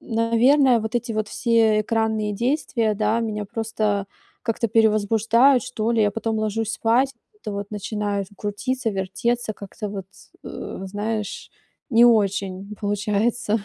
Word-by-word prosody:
н 230 - -7 0.2
наверное, 255 +1 +5
вот 220 +1 -5
эти 240 -1 -1
вот 215 -1 -2
все 225 -3 +3
экранные 220 -1 0
действия, 235 -1 0
да, 215 +2 +1
меня 215 -2 -3
просто, 215 -2 -2 0.4
как-то, 230 -1 -1
перевозбуждают 225 +4 +4
что 235 -3 -2
ли. 230 -2 +3
Я 205 - +3
потом 225 +1 -2
ложусь 215 +1 -1
спать, 235 +5 +2
и, - - -47 0.2
вот 420 - -32
это 210 - -5
вот, 200 0 -5
начинается 205 -1 -3
крутиться, 220 +4 -2
вертеться, 215 +4 -2
как-то 200 +2 -7
вот, 200 -2 -6 0.4
э, - - -7
знаешь, 210 +2 -4 0.4
не 235 -2 +6
очень 200 -3 +1
получается. 210 +1 0
220 Hz, 145 wpm, -23 LUFS, 205-230 Hz, 0.4 s, не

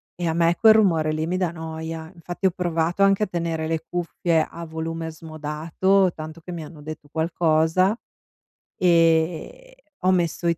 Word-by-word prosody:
e 175 -1 -3
a 160 - +1
me 170 +1 +3
quel 220 -1 +7
rumore 170 -8 +3
lì 155 +1 -2
mi 180 +2 -1
dà 180 -3 0
noia. 160 0 -6
Infatti 175 +2 -2
ho - - +4
provato 175 +1 0
anche 195 +1 +4
a - - 0
tenere 165 -3 -2
le 160 -1 -2
cuffie 170 -1 0
a 170 0 -8
volume 160 0 -4
smodato, 160 +5 0
tanto 155 +1 -8
che 180 - -9
mi 170 -2 -5
hanno 155 0 -12
detto 155 0 -8
qualcosa 160 +4 +2 0.8
e 175 - +1 0.2
ho 185 - +5
messo 175 -1 0
i 170 -1 +1
165 Hz, 170 wpm, -23 LUFS, 160-180 Hz, 0.8 s, quel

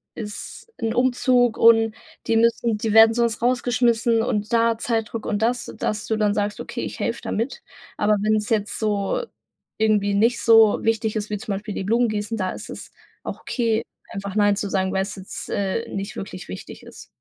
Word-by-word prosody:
ist 215 - -8
'n 225 -1 -1
Umzug 245 -1 +2
und 225 -1 +5 0.3
die 225 - +3
müssen 230 -1 +2
die 215 0 -2
werden 225 0 +8
sonst 235 -1 0
rausgeschmissen 240 -2 +2
und 210 -1 -2
da 230 0 +3
Zeitdruck 225 -1 -2
und 205 0 -1
das 240 +2 -1
dass 215 0 -2
du 220 - 0
dann 210 -1 +1
sagst: 205 0 -2
„Okay, - - -5
ich - - -6
helfe - - -2
da - - -5
mit.“ 230 +6 -2 0.4
Aber 210 0 +3
wenn's 215 0 +1
jetzt 215 -2 -1
so 210 - 0 0.6
irgendwie 210 -2 +2
nicht 230 +4 +2
so 225 -2 +5
wichtig 220 -1 0
ist, 215 -1 -3
wie 210 - -2
zum 200 0 -4
Beispiel 205 +1 -5
die - - -3
Blumen 230 +4 +2
gießen, 215 +1 -3
da 185 -2 -1
ist - - -9
es - - -9 0.3
auch - - -6
okay, 230 -3 0 0.3
einfach 200 -1 -6
Nein 205 -1 +4
zu 200 0 -3
sagen, 190 -1 0
weil's 195 +2 -1
jetzt, 190 - -8
äh, 200 +3 -2
nicht 200 +1 -4
wirklich 185 -2 -7
wichtig 90 +1 -9
ist. - - -12
220 Hz, 190 wpm, -23 LUFS, 205-230 Hz, 0.6 s, werden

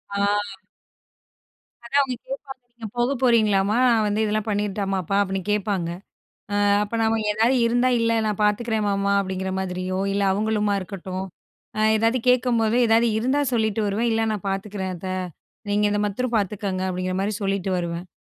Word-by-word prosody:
ஆ. - - -1 1.7
அதான் 280 +4 +3
அவுங்க 255 -2 -4
கேப்பாங்க, 275 - -7
நீங்க 235 -1 -10
போகப்போறீங்களாமா? 230 -5 +2
நான் 225 -2 +3
வந்து 210 +1 0
இதெல்லாம் 215 +1 -1
பண்ணிரட்டாமாப்பா? 195 -2 -1
அப்டின்னு 195 -1 -1
கேப்பாங்க. 200 -4 -1 0.6
அ, - - 0 0.3
அப்ப 210 +2 -5
நாம 225 0 +2
ஏதாவது 225 +5 +2
இருந்தா, 245 +2 +2
இல்ல 230 0 +2
நான் 210 -1 -2
பாத்துக்கிறேன் 215 +1 +1
மாமா 200 0 +1
அப்டிங்கிற 190 -1 -3
மாதிரியோ, 185 0 -3
இல்ல 200 0 0
அவுங்களுமா 210 0 0
இருக்கட்டும், 185 0 -6 0.5
அ - - +1 0.2
ஏதாவது 225 +3 +2
கேக்கும்போது 240 -2 +3
ஏதாவது 230 +1 +4
இருந்தா 260 +6 +1
சொல்லிட்டு 220 -2 +1
வருவேன், 225 +4 0
இல்ல 225 0 +1
நான் 205 -2 -5
பாத்துக்கிறேன் 195 -1 -3
அத்த. 185 +2 -7 0.6
நீங்க 205 +1 +2
இந்த 205 0 0
மத்தரம் 235 +4 -2
பாத்துக்கோங்க, 200 -2 -2
அப்டிங்கிற 185 0 -2
மாரி 205 +2 -1
சொல்லிட்டு 195 -1 -1
வருவேன். 170 0 -4
210 Hz, 150 wpm, -23 LUFS, 195-230 Hz, 1.7 s, ஏதாவது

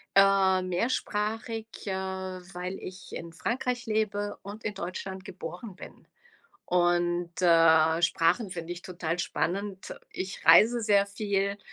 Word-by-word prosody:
ähm, 190 -2 +4
mehrsprachig, 220 +2 -1 0.2
äh, 195 - -2
weil 190 -1 -5
ich 185 +1 -9
in 170 0 -6
Frankreich 245 +6 -2
lebe 215 -2 -1
und 205 +3 -9
in 210 - -2
Deutschland 190 +1 -6
geboren 180 +3 -8
bin. - - -13 0.6
Und, 175 0 +1
äh, 165 -1 +5
Sprachen 170 +5 +2
finde 170 -1 -5
ich 175 - -8
total 175 -2 -4
spannend. 195 +2 -2 0.2
Ich 190 +1 -6
reise 235 +2 +7
sehr 205 -2 +4
viel 200 -1 -1
190 Hz, 125 wpm, -28 LUFS, 175-205 Hz, 0.6 s, reise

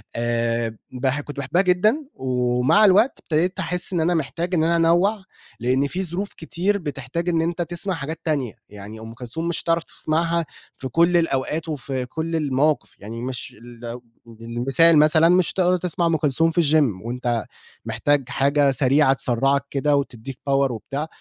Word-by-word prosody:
آآ، 115 -1 -1
باح 130 +3 -1
كنت 145 0 -10
باحبها 140 +6 +1
جدًا 210 +11 +2
ومع 125 +8 +2
الوقت 210 +7 +4
ابتديت 170 +4 0
احس 180 +1 -2
إن 170 - +1
أنا 175 +2 +2
محتاج 170 +3 -2
إن 160 - +2
أنا 170 +1 +2
أنوّع، 175 +5 +2 0.4
لإن 130 +4 +1
في 185 +5 -3
ظروف 185 +4 -4
كتير 185 +5 -1
بتحتاج 150 +1 -4
إن 165 -1 +1
أنت 170 +1 -2
تسمع 175 +3 -3
حاجات 160 +1 -5
تانية، 140 -8 -1 0.2
يعني 105 +2 -10
أم 115 +1 -9
كلثوم 125 +8 -5
مش 170 - -2
هتعرف 165 0 +1
تسمعها 165 +1 -1 0.3
في 130 - -5
كُل 170 +4 +3
الأوقات 160 0 -1
وفي 130 -3 -3
كُل 160 +5 -4
المواقف، 150 0 0
يعني 115 +3 -7
مش 125 -1 -5
ال 120 +1 -9 0.4
المثال 135 +8 +3
مثلًا 155 +2 +5
مش 180 -2 +3
هتقدر 180 -1 +2
تسمع 175 0 -1
أم 165 -1 +2
كلثوم 160 +2 +2
في 175 - +2
الgym 140 -10 +2
وأنت 120 -2 -2 0.4
محتاج 145 -3 0
حاجة 140 +1 +2
سريعة 135 +2 +3
تسرعك 135 +2 +1
كده 145 +1 +1
وتدّيك 135 -1 -4
power 135 -1 +2
وبتاع 135 +7 -5
150 Hz, 165 wpm, -22 LUFS, 125-170 Hz, 0.4 s, مثلًا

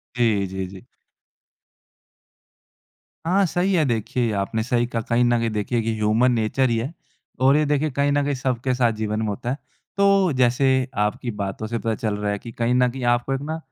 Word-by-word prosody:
जी, 110 -5 +2
जी, 95 0 -4
जी। 95 0 -12 2.4
हाँ, 190 +3 +3
सही 180 +3 0
है। 165 - +3
देखिए, 120 0 -1
ये 115 - 0
आपने 110 +3 -1
सही 120 0 +1
कहा। 115 -2 -2
कहीं 120 +1 +3
न 120 0 +3
कहीं, 115 - 0
देखिए 110 +3 -1
कि 115 0 -1
ह्यूमन 110 +4 +2
नेचर 120 +3 +1
ही 115 - +1
है, 125 +8 -3 0.5
और 135 +2 +5
ये 155 - +2
देखिए, 150 +1 +1
कहीं 140 +2 +1
न 145 0 +2
कहीं 145 - 0
सबके 130 -1 -1
साथ 120 -2 +2
जीवन 110 0 -1
में 110 - -1
होता 105 +3 -3
है। 135 - -1 0.4
तो 195 -2 +4
जैसे 125 +2 +3 0.4
आपकी 115 +3 -3
बातों 100 +2 -3
से 115 - -2
पता 115 -1 -1
चल 110 -1 -2
रहा 105 0 -1
है 100 - -3
कि 115 - -9
कहीं 120 +2 0
न 125 0 +3
कहीं, 130 +1 -6
आपको 120 +2 +1
एक 135 - -2
ना, 160 +2 -4
120 Hz, 210 wpm, -23 LUFS, 110-135 Hz, 2.4 s, और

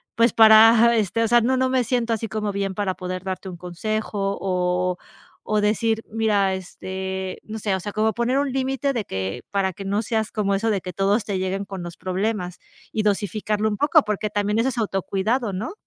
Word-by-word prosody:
pues 230 -1 +4
para, 225 +1 +7
este 215 +2 0
o - - +2
sea, 240 0 +5
no 260 +3 +1
no 260 0 +2
me 255 -1 +2
siento 235 -1 0
así 225 0 -2
como 215 -1 -2
bien 195 -1 -2
para 195 -2 -1
poder 185 0 -5
darte 190 0 -4
un 175 - -8
consejo", 200 +2 -3
o 180 -1 0 0.5
o 215 -1 0
decir: 220 +1 +1
"Mira, 210 -3 +2
este" 190 0 -5
no 220 0 -7
sé, 200 -2 0
o 190 - -3
sea, 205 - -5
como 220 +1 +1
poner 245 +3 +1
un 280 -2 -1
límite 270 +1 0
de 230 -4 -1
que 95 +5 -4
para 195 -2 0
que 195 - -8
no 200 +2 0
seas 220 0 -1
como 200 -2 0
eso 225 +3 0
de 200 - +1
que 180 - -7
todos 200 +3 +1
te 200 -2 -2
lleguen 190 +1 -2
con 190 -2 -7
los 170 -1 -8
problemas 185 -1 -2 0.3
y 215 - 0
dosificarlo 210 +1 0
un 210 - -2
poco, 300 +3 +4
porque 210 0 -2
también 210 +1 0
eso 260 +3 +2
es 255 - -6
autocuidado, 210 +3 -1
¿no? 220 - -4
210 Hz, 210 wpm, -23 LUFS, 190-225 Hz, 0.5 s, para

